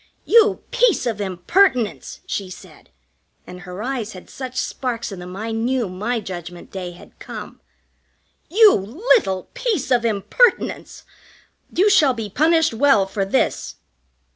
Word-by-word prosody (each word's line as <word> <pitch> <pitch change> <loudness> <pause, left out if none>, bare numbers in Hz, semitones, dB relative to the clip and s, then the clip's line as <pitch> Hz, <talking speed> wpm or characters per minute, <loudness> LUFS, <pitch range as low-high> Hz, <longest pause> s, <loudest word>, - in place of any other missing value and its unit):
"You 440 -3 +4
piece 480 -5 +2
of 225 -4 -2
impertinence!" 230 - 0
she 195 -2 -4
said, 185 - -14 0.6
and 180 0 -10
her 180 +3 -7
eyes 245 -4 -3
had 185 - -12
such 255 -1 -7
sparks 235 -4 -3
in 195 - -7
them 180 +1 -8
I 220 +3 -4
knew 235 +1 -1
my 210 +6 -2
judgment 175 -3 -8
day 180 -2 -6
had 175 - -17
come. - - -9 0.9
"You 425 +3 +7
little 210 - +1
piece 415 - -2
of 245 -2 +3
impertinence! 230 - 0 0.7
You 385 +4 +3
shall 305 -11 +4
be 220 -4 -5
punished 320 - +3
well 225 -5 +4
for 195 +1 -3
this." 200 +7 -1
230 Hz, 140 wpm, -21 LUFS, 195-300 Hz, 0.9 s, You